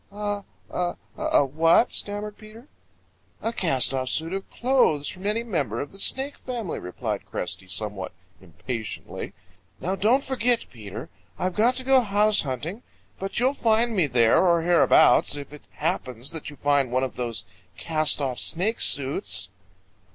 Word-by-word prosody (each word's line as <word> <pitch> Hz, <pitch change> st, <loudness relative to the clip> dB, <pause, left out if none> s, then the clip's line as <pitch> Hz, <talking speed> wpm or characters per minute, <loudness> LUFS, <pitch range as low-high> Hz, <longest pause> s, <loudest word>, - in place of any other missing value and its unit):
"A 205 Hz, 0 st, -3 dB, 0.3 s
a 175 Hz, -1 st, -1 dB, 0.2 s
a 145 Hz, -, +3 dB
what?" 165 Hz, -, +4 dB
stammered 205 Hz, 0 st, -3 dB
Peter. 220 Hz, +5 st, -14 dB, 0.7 s
"A 225 Hz, -, -2 dB
cast 135 Hz, -, +1 dB
off 130 Hz, -1 st, -1 dB
suit 165 Hz, +6 st, 0 dB
of 195 Hz, 0 st, -4 dB
clothes 240 Hz, -, +2 dB
from 185 Hz, +2 st, -4 dB
any 220 Hz, +3 st, +1 dB
member 145 Hz, -, -1 dB
of 145 Hz, -, -4 dB
the 195 Hz, -, -12 dB
Snake 270 Hz, +7 st, 0 dB
family," 235 Hz, -8 st, -4 dB
replied 90 Hz, 0 st, -4 dB
Cresty 95 Hz, -, -3 dB
somewhat 100 Hz, +1 st, -3 dB, 0.3 s
impatiently. 110 Hz, -, -6 dB, 0.5 s
"Now 185 Hz, -, -1 dB
don't 235 Hz, +8 st, +3 dB
forget, 245 Hz, -2 st, +1 dB
Peter. 110 Hz, -, -8 dB, 0.3 s
I've 185 Hz, 0 st, -1 dB
got 235 Hz, +6 st, +3 dB
to 260 Hz, -, -5 dB
go 265 Hz, 0 st, +5 dB
house 210 Hz, -1 st, +3 dB
hunting, 150 Hz, -, -4 dB, 0.4 s
but 195 Hz, +3 st, -3 dB
you'll 255 Hz, +3 st, +3 dB
find 230 Hz, -2 st, +2 dB
me 180 Hz, -6 st, +3 dB
there 120 Hz, +1 st, +4 dB
or 170 Hz, -2 st, +4 dB
hereabouts, 170 Hz, -3 st, +5 dB
if 145 Hz, 0 st, -7 dB
it 150 Hz, -, -12 dB
happens 135 Hz, -6 st, -2 dB
that 160 Hz, -2 st, -6 dB
you 145 Hz, -, -10 dB
find 140 Hz, -2 st, +2 dB
one 130 Hz, +1 st, +2 dB
of 130 Hz, -, -3 dB
those 120 Hz, -3 st, -2 dB, 0.3 s
cast 155 Hz, -2 st, +1 dB
off 130 Hz, -3 st, -2 dB
Snake 195 Hz, +8 st, 0 dB
suits." 100 Hz, -10 st, -1 dB
170 Hz, 160 wpm, -25 LUFS, 130-215 Hz, 0.7 s, go